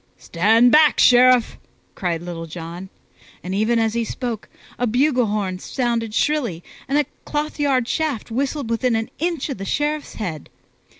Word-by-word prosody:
"Stand 225 +8 +3
back, 305 -1 +5
Sheriff!" 250 -1 +5 0.3
cried 170 -3 -3
Little 170 -1 -6
John; 170 +3 -8 0.5
and 185 - -4
even 220 +4 +1
as 225 -1 +1
he 235 0 0
spoke, 230 -1 -5 0.3
a 245 - +1
bugle 250 +1 +2
horn 200 -3 -2
sounded 230 -2 -2
shrilly 245 - 0 0.2
and 275 - +1
a 295 - +2 0.2
clothyard 290 -4 -1
shaft 290 -8 -2
whistled 270 0 -2
within 235 +1 +1
an 225 0 -2
inch 335 -3 -1
of 265 - -5
the - - -4
Sheriff's 295 +5 -2
head. 170 -9 -5
235 Hz, 155 wpm, -21 LUFS, 200-275 Hz, 0.5 s, back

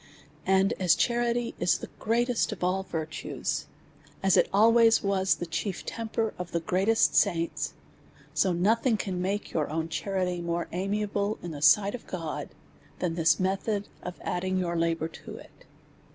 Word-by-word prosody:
And 190 +1 +4
as 180 -3 +4
charity 240 +1 0
is - - +3
the - - -9
greatest 240 +2 +1
of 210 - -6
all 185 +2 +1
virtues, 160 -4 -4 0.6
as 195 -1 +4
it - - +4
al 220 +4 +5
ways 230 -1 +5
was 195 -1 +2
the 175 - -5
chief 180 +3 -3
temper 225 -1 -2
of 180 -1 -6
the 170 - +1
greatest 190 +7 +2
saints; 170 -5 +1 0.6
so 190 - +2
nothing 220 +7 +2
can 185 -3 -3
make 200 +3 -2
your 150 -3 -1
ow 160 +1 0
n 160 - -6
charity 180 0 -2
more 170 0 -2
amiable 200 +3 -1
in 175 - -5
the 145 -2 -7
sight 200 +7 +5
of 250 - -8
God, 165 -4 -4 0.5
than 180 -2 -1
this 165 0 +3
method 195 +2 -1
of 180 - -7
adding 185 +1 -1
your 175 -2 -1
la 165 0 +1
bour 160 0 -3
to 165 - -10
it. - - -16
190 Hz, 170 wpm, -28 LUFS, 170-210 Hz, 0.6 s, al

